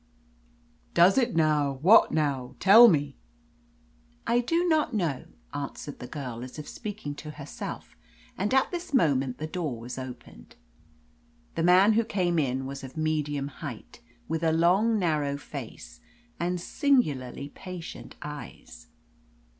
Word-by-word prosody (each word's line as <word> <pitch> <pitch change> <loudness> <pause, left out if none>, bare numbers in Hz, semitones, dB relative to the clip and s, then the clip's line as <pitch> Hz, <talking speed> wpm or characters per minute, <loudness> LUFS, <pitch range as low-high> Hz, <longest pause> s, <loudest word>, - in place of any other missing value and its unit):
"Does 180 +3 +6
it, 245 -5 +1
now? 150 -3 +2
What, 200 +6 +7
now? 135 -4 -1
Tell 220 +5 +9
me." 145 - +1 1.1
"I 235 +1 +2
do 335 +9 +1
not 305 -6 +1
know," 165 -10 -1 0.3
answered - - -6
the 125 - -7
girl, 125 -5 -6
as 130 +3 -9
if 150 - -7
speaking 205 -10 -6
to 150 - -8
herself, 150 -1 -8 0.4
and 205 +2 -2
at 265 0 +3
this 345 -4 -4
moment 135 - +2
the 155 - -4
door 155 -7 -4
was 125 +3 -7
opened. 125 -2 -10 1.0
The 165 - -2
man 185 +5 +6
who 230 +2 +3
came 180 -6 0
in 135 -2 -1
was 135 0 -7
of 130 +3 -10
medium 150 -3 -1
height, 140 - -9 0.3
with 160 +1 -2
a 160 - +3
long, 185 +8 +3
narrow 150 -6 0
face, 140 - -9 0.4
and 180 +1 -1
singularly 150 - 0
patient 180 +2 -9
eyes. 140 - -9
155 Hz, 140 wpm, -27 LUFS, 140-200 Hz, 1.1 s, Tell